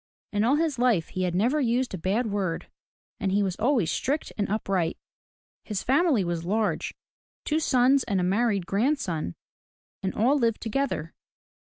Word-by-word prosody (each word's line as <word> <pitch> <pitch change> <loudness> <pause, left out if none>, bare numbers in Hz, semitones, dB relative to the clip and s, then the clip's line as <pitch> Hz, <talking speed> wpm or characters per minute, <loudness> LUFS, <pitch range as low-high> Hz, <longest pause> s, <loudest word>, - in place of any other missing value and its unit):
In 205 0 +2
all 250 +5 +4
his 310 -4 0
life 235 -10 +2
he 185 0 -2
had 175 -1 -1
never 245 +11 +2
used 245 -1 0
a - - -2
bad 200 +8 0
word, 200 -5 -2 0.5
and 195 -4 0
he 200 +1 +2
was 190 -2 -1
always 230 - +2
strict 290 +4 -2
and 205 -2 -1
upright. 195 -5 0 0.7
His 210 -3 -3
family 275 - +3
was 170 -1 -2
large, 210 +4 -1 0.2
— - - -80
two 310 +1 +1
sons 265 -2 +3
and 195 -2 0
a - - +1
married 200 0 +1
grandson, 195 - -1 0.3
— - - -85
and 190 - -2
all 260 +7 +3
lived 230 -3 +1
together. 225 - -2
215 Hz, 175 wpm, -26 LUFS, 190-255 Hz, 0.7 s, all